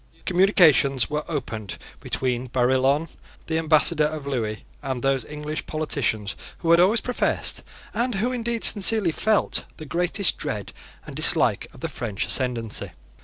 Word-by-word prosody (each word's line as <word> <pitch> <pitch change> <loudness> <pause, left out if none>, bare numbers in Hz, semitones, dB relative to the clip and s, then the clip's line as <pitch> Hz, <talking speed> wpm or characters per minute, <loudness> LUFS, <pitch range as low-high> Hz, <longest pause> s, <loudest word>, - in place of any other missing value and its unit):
Communications 165 - +3
were 150 0 -2
opened 115 - -5 0.2
between 125 -1 -2
Barillon, 130 +5 +1 0.4
the 160 0 -1
Ambassador 155 0 +3
of 150 -1 -4
Lewis, 115 -6 -3 0.2
and 130 -3 -4
those 135 -2 +1
English 150 +1 -6
politicians 125 -10 -2 0.2
who 165 - -1
had 170 - +6
always 205 +6 +3
professed, 250 - 0 0.3
and 240 -1 -1
who 225 +6 0
indeed 235 -2 -3
sincerely 205 -3 +5
felt, 215 +5 0
the 155 - -9
greatest 175 +5 0
dread 105 -3 -5 0.3
and - - -10
dislike - - +3
of - - -16
the - - -2
French 105 -3 -4
ascendency. 120 -4 -2
150 Hz, 140 wpm, -23 LUFS, 125-180 Hz, 0.4 s, had